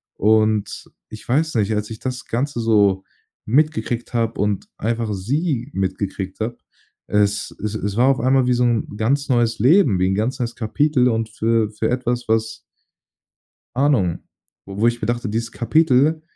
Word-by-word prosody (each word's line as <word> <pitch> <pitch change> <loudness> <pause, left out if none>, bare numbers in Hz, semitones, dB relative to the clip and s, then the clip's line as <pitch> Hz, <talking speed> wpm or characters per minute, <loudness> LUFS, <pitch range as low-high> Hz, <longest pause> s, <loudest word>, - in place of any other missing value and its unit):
Und 110 0 +1 0.2
ich 110 - -11
weiß 155 +5 +1
nicht, 110 -1 +1
als 105 0 -3
ich 110 - -7
das 130 -1 -5
Ganze 125 +2 -2
so 100 -4 +3 0.4
mitgekriegt 130 -2 0
habe 115 -1 -1
und 105 -1 -1
einfach 115 0 -2
sie 130 - -2
mitgekriegt 95 0 -3
habe, 115 +2 -3 0.5
es 105 -1 0
es 105 0 -3
es 105 -1 -3
war 125 +2 +4
auf 135 -1 +3
einmal 130 0 +3
wie 125 - +3
so 125 0 +1
'n 120 -2 +1
ganz 135 +6 0
neues 120 -2 +1
Leben, 130 - +4
wie 90 - +2
'n 95 - +1
ganz 110 +6 -1
neues 120 -1 -3
Kapitel 125 +2 +1
und 110 -1 -1
für 110 0 0
für 105 - -2
etwas, 125 -1 -2
was 110 0 0 1.2
Ahnung, 125 - +2 0.5
wo 95 0 -9
wo 115 - +5
ich 120 0 0
mir - - -1
dachte, 120 -1 -2
dieses 115 +2 -3
Kapitel 155 +4 +2
115 Hz, 170 wpm, -21 LUFS, 105-125 Hz, 1.2 s, wo